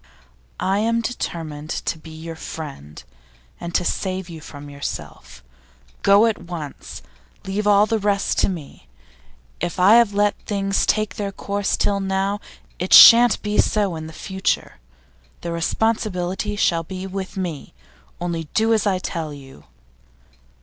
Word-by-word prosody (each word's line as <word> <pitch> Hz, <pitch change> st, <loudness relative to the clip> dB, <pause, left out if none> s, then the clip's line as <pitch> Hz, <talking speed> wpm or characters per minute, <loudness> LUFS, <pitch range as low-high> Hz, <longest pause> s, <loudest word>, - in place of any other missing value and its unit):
'I 195 Hz, +2 st, +1 dB
am 230 Hz, +2 st, +1 dB
determined 160 Hz, -10 st, -5 dB
to 160 Hz, -, -3 dB
be 160 Hz, -, -12 dB
your 160 Hz, +1 st, -8 dB
friend, 140 Hz, -, -8 dB, 0.6 s
and 170 Hz, 0 st, -6 dB
to 180 Hz, -, +1 dB
save 185 Hz, -1 st, -2 dB
you 165 Hz, -2 st, -9 dB
from 145 Hz, -2 st, -10 dB
yourself. 65 Hz, -, -7 dB, 0.6 s
Go 200 Hz, +3 st, +6 dB
at 225 Hz, -5 st, 0 dB
once! 170 Hz, -5 st, -8 dB, 0.4 s
Leave 205 Hz, +2 st, -2 dB
all 205 Hz, 0 st, +6 dB
the 220 Hz, +1 st, 0 dB
rest 200 Hz, -1 st, 0 dB
to -, -, +3 dB
me. 155 Hz, -, -8 dB, 0.7 s
If 175 Hz, +1 st, -3 dB
I 200 Hz, +5 st, +7 dB
have 235 Hz, -3 st, +4 dB
let 205 Hz, 0 st, +2 dB
things 195 Hz, -1 st, -1 dB
take 215 Hz, -1 st, 0 dB
their 200 Hz, -1 st, -3 dB
course 200 Hz, 0 st, -2 dB
till 200 Hz, -1 st, +1 dB
now, 195 Hz, +1 st, -1 dB, 0.4 s
it 180 Hz, -, 0 dB
shan't 235 Hz, 0 st, +9 dB
be 210 Hz, 0 st, -1 dB
so 205 Hz, -5 st, +2 dB
in 160 Hz, 0 st, -7 dB
future. 190 Hz, -, -2 dB, 0.6 s
The 170 Hz, -, -4 dB
responsibility 190 Hz, +2 st, -1 dB
shall 170 Hz, -4 st, +2 dB
be 185 Hz, +3 st, -7 dB
with 195 Hz, 0 st, -6 dB
me. 175 Hz, -6 st, -5 dB, 0.4 s
Only 170 Hz, -2 st, -3 dB
do 225 Hz, +1 st, +3 dB
as 215 Hz, -1 st, +1 dB
I 190 Hz, -2 st, +2 dB
tell 165 Hz, -4 st, -4 dB
you. 135 Hz, -, -13 dB
190 Hz, 145 wpm, -22 LUFS, 165-205 Hz, 0.7 s, shan't